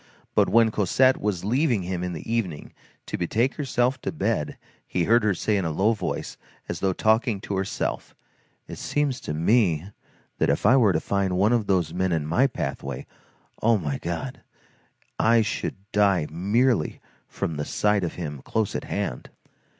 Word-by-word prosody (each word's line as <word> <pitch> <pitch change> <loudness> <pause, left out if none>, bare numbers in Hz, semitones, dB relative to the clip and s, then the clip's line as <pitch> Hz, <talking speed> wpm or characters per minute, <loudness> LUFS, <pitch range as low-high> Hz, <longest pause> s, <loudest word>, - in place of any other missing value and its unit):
But - - +3
when 115 -1 +5
Cosette 130 +6 +3
was 100 -4 -1
leaving 120 - +1
him 90 0 -3
in 90 -1 -3
the 80 - -7
evening, 100 -10 -2 0.3
to - - -4
betake 115 +9 +1
herself 130 -2 0
to - - -2
bed, 115 - -1 0.3
he 90 - 0
heard 115 +4 +4
her 105 -3 +2
say 105 +4 0
in 95 - 0
a 80 - -1
low 95 +8 +2
voice, 110 - -4 0.3
and - - -6
as - - -4
though 95 - +1
talking 110 +2 +2
to 100 - -4
herself: 95 +1 -3 0.5
"It - - -8
seems 145 -3 -1
to 75 - -4
me, 90 -1 +2 0.5
that - - +2
if - - 0
I 120 +5 +7
were 115 -7 +5
to 80 - +2
find 95 -1 0
one 105 +5 +3
of 115 -4 +1
those 90 -5 +1
men 95 +1 0
in 80 -3 0
my 120 - +3
pathway, 70 - -4 0.6
oh, 115 0 +4
my 75 -7 -3
God, 85 +10 -5 0.8
I 115 0 +4
should 105 - -3 0.2
die 100 -6 +3
merely 100 +3 +1 0.3
from 80 - -4
the 75 - -1
sight 105 +5 +1
of 85 - -3
him 75 -6 -5
close 110 +6 -1
at - - -3
hand." - - -3
100 Hz, 180 wpm, -25 LUFS, 85-115 Hz, 0.8 s, I